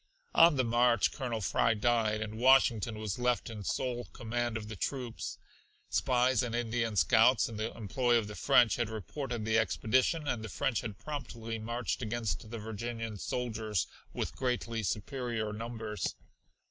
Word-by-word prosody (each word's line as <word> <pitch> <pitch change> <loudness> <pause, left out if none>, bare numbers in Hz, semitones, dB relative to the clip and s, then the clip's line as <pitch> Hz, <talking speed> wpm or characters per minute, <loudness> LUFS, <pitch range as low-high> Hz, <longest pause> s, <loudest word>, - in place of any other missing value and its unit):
On 165 -2 +7
the 130 - +2
march 120 -1 +3
Colonel 120 -5 -3
Fry 110 +4 +2
died, 110 -1 +1
and 110 +1 -5
Washington 120 -4 +4
was 110 0 -3
left 125 -1 0
in 105 -2 -7
sole 120 +4 -2
command 120 0 -3
of 105 -1 -7
the 110 - -6
troops. 125 +3 -4 0.5
Spies 125 -1 +2
and 120 -2 -2
Indian 115 -2 -1
scouts 110 - +5
in 115 - -7
the 110 +2 -2
employ 120 +3 +1
of 110 -3 -1
the 105 - -7
French 110 0 +4
had 120 -2 0
reported 115 +2 -4
the 110 +1 +3
expedition 130 +8 +1
and 115 -5 -1
the 110 - -5
French 120 +4 0
had 105 -4 -6
promptly 115 -6 -5
marched 115 +1 -3
against 110 -2 -2
the 115 - -5
Virginian 110 0 -5
soldiers 110 -6 -2 0.3
with - - -3
greatly 120 -3 -1
superior 110 +1 -2
numbers. 110 -1 -4
115 Hz, 160 wpm, -32 LUFS, 110-120 Hz, 0.5 s, On